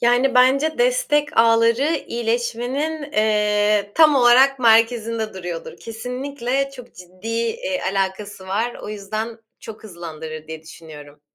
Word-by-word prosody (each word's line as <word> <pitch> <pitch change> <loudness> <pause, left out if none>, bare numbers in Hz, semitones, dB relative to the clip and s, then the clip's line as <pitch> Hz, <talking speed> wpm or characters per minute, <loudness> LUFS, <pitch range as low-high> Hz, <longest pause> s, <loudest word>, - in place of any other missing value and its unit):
Yani, 245 +2 +2
bence 275 - +3
destek 485 -13 +1
ağları 230 +7 +3
iyileşmenin, 245 +6 -3
eee, 210 -1 +1
tam 310 -2 +6
olarak 260 +2 +5
merkezinde 230 -2 +2
duruyordur. 175 -3 -7
Kesinlikle 250 +3 -4
çok 250 -3 -13
ciddi, 185 +4 -11
eee, 230 +4 -2
alakası 195 0 -3
var. 225 +5 -1
O - - -7
yüzden 215 +2 -5 0.2
çok 220 0 -11
hızlandırır 160 -4 -8
diye 160 0 -8
düşünüyorum. 150 -3 -13
230 Hz, 115 wpm, -21 LUFS, 205-260 Hz, 0.2 s, tam